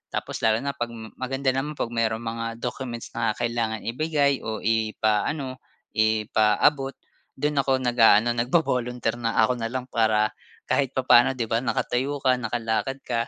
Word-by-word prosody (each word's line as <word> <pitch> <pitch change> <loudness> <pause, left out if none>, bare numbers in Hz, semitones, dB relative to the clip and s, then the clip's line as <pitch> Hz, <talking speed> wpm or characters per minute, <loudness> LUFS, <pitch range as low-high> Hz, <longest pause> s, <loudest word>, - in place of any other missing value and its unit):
tapos - - -4
lalo 110 +2 +2
na 140 - -1
pag 120 -4 -3 0.3
maganda 135 +1 0
naman 140 +4 -3
pag 120 - -3
mayroong 115 -1 -1
mga 115 0 -4
documents 120 -1 -5
na 115 -2 +1
kailangan 115 -2 -1
ibigay 140 +2 +1
o 110 -1 -5
ipaano, 110 +5 0 0.3
ipaabot, 110 +5 +2 0.4
do'n 145 +1 0
ako 135 -1 +1
nag-a-ano 120 -2 +5
nagvo-volunteer 125 -2 0
na 115 -1 -1
ako 125 +2 +1
na 115 - -1
lang 125 +2 -5
para 110 -2 +2 0.4
kahit 135 -2 +1
papaano, 130 0 +5
'di 115 -3 -3
ba, 115 - +3
nakatayo 130 +2 -1
ka, 130 -1 +3
nakalakad 120 +3 -2
ka, 115 -2 -1
120 Hz, 150 wpm, -25 LUFS, 115-130 Hz, 0.4 s, nag-a-ano